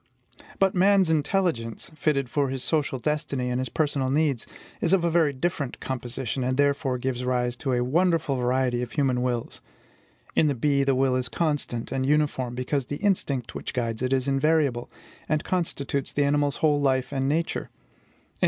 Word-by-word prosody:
But 195 -1 +3
man's 190 -2 +4
intelligence, 155 - 0
fitted 140 -4 0
for 140 +2 0
his 130 -1 -3
social 150 -4 0
destiny 135 -2 -1
and 125 - 0
his 130 - -3
personal 140 -4 0
needs, 140 -3 +1 0.3
is 170 - +2
of 190 -3 +3
a 170 - +2
very 160 -3 +3
different 140 -2 -3
composition, 130 0 -3
and 130 +1 0
therefore 140 -2 +1
gives 125 0 -2
rise 125 -1 0
to 135 +1 -1
a 125 0 +1
wonderful 160 +1 +1
variety 125 0 +1
of 125 - -5
human 130 -4 +1
wills. 120 -2 -2 0.7
In 155 - +4
the 145 - +1
bee, 140 +3 +2
the 135 -1 +2
will 130 0 +2
is 125 -2 -1
constant 145 -4 -2
and 135 -1 -1
uniform, 140 -4 +1
because 130 +1 -1
the 145 - -3
instinct 140 - 0
which - - -6
guides 115 -2 -2
it 130 0 -1
is 130 0 +1
invariable, 140 -3 +1 0.4
and 155 0 +1
constitutes 140 -6 -2
the 145 - +2
animal's 145 0 +1
whole 145 -1 +3
life 130 -1 +1
and 135 0 0
nature. 165 +3 -1
135 Hz, 175 wpm, -26 LUFS, 125-150 Hz, 0.7 s, man's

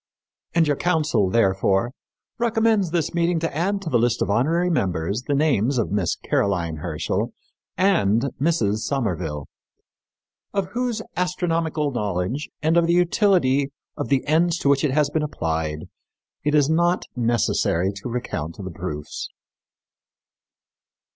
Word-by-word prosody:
And 170 -1 +5
your 145 -2 +1
council, 155 - +1
therefore, 95 +1 +2 0.5
recommends 225 -5 +2
this 165 -1 -1
meeting 170 0 +1
to 165 -3 -2
add 195 +5 0
to 165 - -3
the 120 - +4
list 120 -1 +1
of 100 - -1
honorary 165 - +2
members 95 - 0
the 145 - +1
names 140 -4 +2
of 115 - 0
Miss 100 -4 0
Caroline 85 -5 -1
Herschel 80 -1 -2 0.4
and 145 - +3 0.2
Mrs. 140 -10 +2
Somerville, 90 - -2 1.1
of 195 -2 0
whose 240 -2 -2
astronomical 165 -4 0
knowledge, 105 +4 -2
and 160 +2 +3
of 170 -1 +4
the 170 - +3
utility 175 - +3 0.3
of - - -4
the 135 -2 +2
ends 165 +3 +2
to 140 - 0
which 140 -1 +3
it 150 - +2
has 145 +1 +1
been 155 - 0
applied, 80 - -2 0.6
it 150 +1 +1
is 145 -2 +4
not 170 +3 +2
necessary 115 -6 +1
to 100 - -6
recount 85 -10 -4
the 95 -3 -6
proofs." 75 -3 -5
140 Hz, 140 wpm, -23 LUFS, -, 1.1 s, And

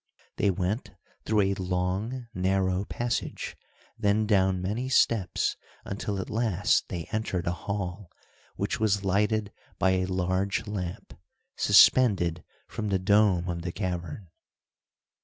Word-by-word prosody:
They 100 - +2
went 95 +4 -2 0.3
through 110 -1 +3
a 100 0 +2
long, 95 +7 -2
narrow 95 0 0
passage, 120 +2 -3 0.4
then 105 +1 +2
down 95 -3 +2
many 105 +8 -2
steps, 110 -8 +2 0.3
until 100 0 -3
at 95 - -4
last 105 -3 +1
they 85 -3 -4
entered 110 -5 -2
a 85 - +1
hall, 90 0 -4 0.5
which - - -2
was 100 -2 +1
lighted 105 +2 +1 0.3
by 95 - +3
a 95 0 +1
large 95 +3 -1
lamp, 100 -2 -5 0.4
suspended 90 -10 +5 0.2
from 105 -2 -4
the 95 - +2
dome 95 -2 +3
of 85 -1 -3
the 90 +1 -4
cavern. 90 -1 -4
95 Hz, 125 wpm, -27 LUFS, 90-105 Hz, 0.5 s, suspended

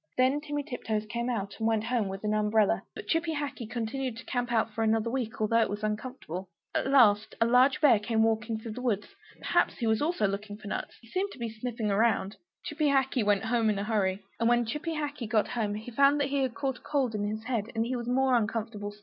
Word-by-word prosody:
Then 260 +3 +3
Timmy 290 -1 -3
Tiptoes 220 -5 -3
came 235 +3 -3
out, 200 -5 -2
and 225 - +1
went 220 -1 +1
home 235 -3 0
with 195 +1 -6
an 210 0 0
umbrella. 215 0 +2
But - - -7
Chippy 325 -1 0
Hackee 280 -6 -4
continued 245 +1 -3
to 230 - -9
camp 245 -1 -2
out 225 -1 +1
for 225 - -1
another 225 +1 +1
week, 245 -4 -3
although 220 +2 +3
it - - +1
was 205 +1 -4
uncomfortable. 210 -5 -4 0.2
At - - 0
last 220 -6 +4
a 230 - +4
large 255 +5 +4
bear 255 -8 +6
came 220 +1 +1
walking 225 0 0
through 220 +1 -7
the 245 +4 -6
wood. 215 -5 0 0.4
Perhaps - - +1
he 235 - -2
also 220 +5 +2
was 345 - -2
looking 205 0 -1
for 210 -1 -9
nuts; - - -4
he 230 - -18
seemed 375 - -1
to - - -13
be 235 -2 -3
sniffing 225 -2 -3
around. 205 -1 +1 0.3
Chippy 300 0 -1
Hackee 265 -3 +2
went 205 +1 +2
home 225 -1 +2
in 210 - +1
a 200 - -1
hurry! 200 -3 0 0.2
And 230 0 +3
when 240 0 +3
Chippy 300 +7 -3
Hackee 290 -6 -4
got 215 -1 +2
home, 215 -4 -1
he 220 +3 -7
found 280 +4 +4
he 280 0 +1
had 260 -3 -1
caught 270 -2 -2
a - - -29
cold 270 -6 0
in 205 -1 -1
his 215 +1 -4
head; 225 -3 -2
and 225 0 +1
he 255 +2 -2
was 240 -1 -4
more 260 +1 +2
uncomfortable 220 -2 -1
still. 205 - -17
230 Hz, 245 wpm, -29 LUFS, 215-255 Hz, 0.4 s, bear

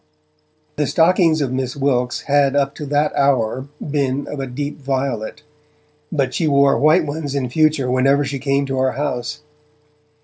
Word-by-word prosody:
The 150 -2 0
stockings 165 -1 +3
of 135 -3 -1
Miss 130 -1 -3
Wilkes 125 -3 0
had 140 -1 +2
up 140 0 +1
to 150 0 -7
that 145 +1 0
hour 130 -2 +1 0.2
been 140 -1 -1
of 150 - -6
a 135 - -3
deep 145 +4 -5
violet, 135 -1 -3 0.7
but 135 -5 -1
she 165 - 0
wore 140 -1 +4
white 155 +3 +3
ones 145 -1 -4
in 130 -3 -1
future 155 -2 +2
whenever 135 +3 +2
she 140 0 -4
came 140 +1 0
to 135 -1 -2
our 130 0 +1
house. 145 +1 -3
140 Hz, 165 wpm, -19 LUFS, 130-150 Hz, 0.7 s, wore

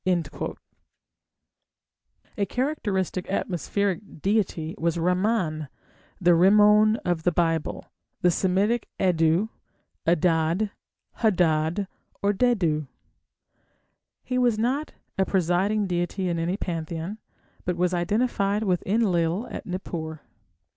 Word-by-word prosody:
A 200 -1 -1
characteristic 205 - -1
atmospheric 190 -1 -2
deity 190 -6 0
was 170 0 0
Ramman, 180 -3 0 0.5
the 175 -1 +4
Rimmon 210 +4 +6
of 175 -2 0
the 180 - +2
Bible, 165 -2 0 0.4
the 180 - +4
Semitic 200 +6 +1
Addu, 175 +2 +2 0.6
Adad, 170 +4 +2 0.5
Hadad, 175 -3 +2 0.4
or 200 +1 +3
Dadu. 185 - +1 1.4
He 255 -1 -1
was 240 -3 +3
not 260 +7 -1 0.3
a 190 - +4
presiding 190 +3 +1
deity 180 +1 -1
in 170 -1 -1
any 175 +4 -1
pantheon, 170 +3 -4 0.4
but 180 -1 -2
was 180 +1 +1
identified 205 +2 +1
with 185 -4 +1
Enlil 190 -2 +1
at - - -7
Nippur. 160 -4 -5
185 Hz, 100 wpm, -25 LUFS, 170-210 Hz, 1.4 s, Rimmon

